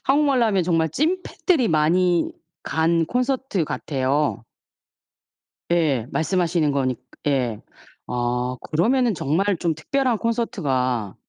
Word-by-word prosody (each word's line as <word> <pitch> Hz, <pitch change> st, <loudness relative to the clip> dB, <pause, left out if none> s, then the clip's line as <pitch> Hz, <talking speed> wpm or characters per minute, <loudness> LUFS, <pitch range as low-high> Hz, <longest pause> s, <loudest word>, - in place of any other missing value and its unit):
한국말로 275 Hz, -2 st, +3 dB
하면 195 Hz, -4 st, +2 dB
정말 165 Hz, -2 st, +1 dB
찐팬들이 325 Hz, -, 0 dB
많이 170 Hz, +2 st, +2 dB, 0.3 s
간 165 Hz, +1 st, +1 dB
콘서트 250 Hz, -, -1 dB
같아요. 140 Hz, -2 st, -1 dB, 1.3 s
예, 150 Hz, -9 st, +2 dB
말씀하시는 170 Hz, -3 st, +1 dB
거니까 130 Hz, -3 st, -1 dB, 0.3 s
예. 125 Hz, -6 st, 0 dB, 0.5 s
아 125 Hz, +1 st, -1 dB, 0.2 s
그러면은 235 Hz, +9 st, +2 dB
정말 170 Hz, +6 st, +1 dB
좀 170 Hz, -1 st, 0 dB
특별한 250 Hz, -, 0 dB
콘서트가 135 Hz, -, -1 dB
165 Hz, 245 characters per minute, -22 LUFS, 140-230 Hz, 1.3 s, 한국말로